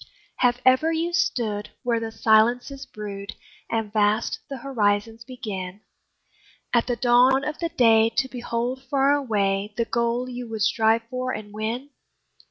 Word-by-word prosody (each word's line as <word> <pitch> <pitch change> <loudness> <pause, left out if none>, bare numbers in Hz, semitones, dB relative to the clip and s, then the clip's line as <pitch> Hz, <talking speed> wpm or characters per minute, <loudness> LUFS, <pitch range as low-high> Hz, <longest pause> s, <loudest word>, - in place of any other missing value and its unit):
Have 245 -1 +2
ever 260 +5 +4
you 330 +2 -1
stood 220 - -1
where 235 -2 +1
the 225 0 -5
silences 240 +5 +2
brood, 200 -1 -7 0.3
And 225 -2 -2
vast 215 +1 +1
the 275 - -5
horizons 225 -3 -1
begin, 210 -7 -6 0.9
At 235 -1 +3
the 245 - 0
dawn 250 +3 +4
of 300 0 -4
the 335 - -1
day 225 -5 +4
to 270 - +2
behold 245 0 -3
far 275 -1 +3
away 205 -6 0
The 230 - +1
goal 235 +2 -1
you 245 -1 -7
would 220 -2 -2
strive 225 +1 +2
for 255 0 -2
and 210 -1 -7
win? 230 +6 -4
235 Hz, 150 wpm, -24 LUFS, 215-255 Hz, 0.9 s, ever